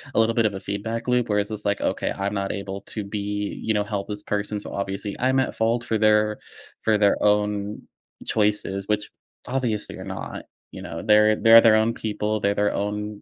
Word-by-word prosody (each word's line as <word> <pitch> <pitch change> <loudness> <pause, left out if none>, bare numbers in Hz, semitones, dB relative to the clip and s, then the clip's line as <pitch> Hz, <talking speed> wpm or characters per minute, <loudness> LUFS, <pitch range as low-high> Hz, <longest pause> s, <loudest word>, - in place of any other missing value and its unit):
a - - +4
little 115 +1 +2
bit 115 -2 +3
of 105 - +1
a 95 - -6
feedback 115 +5 -4
loop, 125 -1 +2
where 105 - +2
it's 100 - -2
just 105 -1 -6
like, 100 0 +1
"Okay, - - -1
I'm 100 +1 -3
not 100 -1 -2
able 100 -1 -5
to 105 +2 -6
be" 105 0 -4
you 110 - +1
know, 105 -1 +1
"help 100 -1 -4
this 105 -1 -6
person, 105 0 -2
so, - - -8
obviously, 100 +1 -4
I'm 130 +1 +2
at 130 - -2
fault 115 +2 +1
for 115 -2 0
their 105 0 +3 0.4
for 110 -1 +2
their 100 -1 +3
own 105 0 +1 0.4
choices," 105 -2 0
which 105 -1 -1 0.4
obviously, 125 -5 -2
you're - - -8
not, - - -6 0.3
you - - -9
know? 85 0 -6
They're 105 0 +5
they're 115 +1 +8
their 115 -2 +6
own 110 +1 +2
people, 105 -1 -2
they're 100 0 +1
their 105 0 +1
own 105 +1 -3
105 Hz, 215 wpm, -24 LUFS, 100-110 Hz, 0.4 s, they're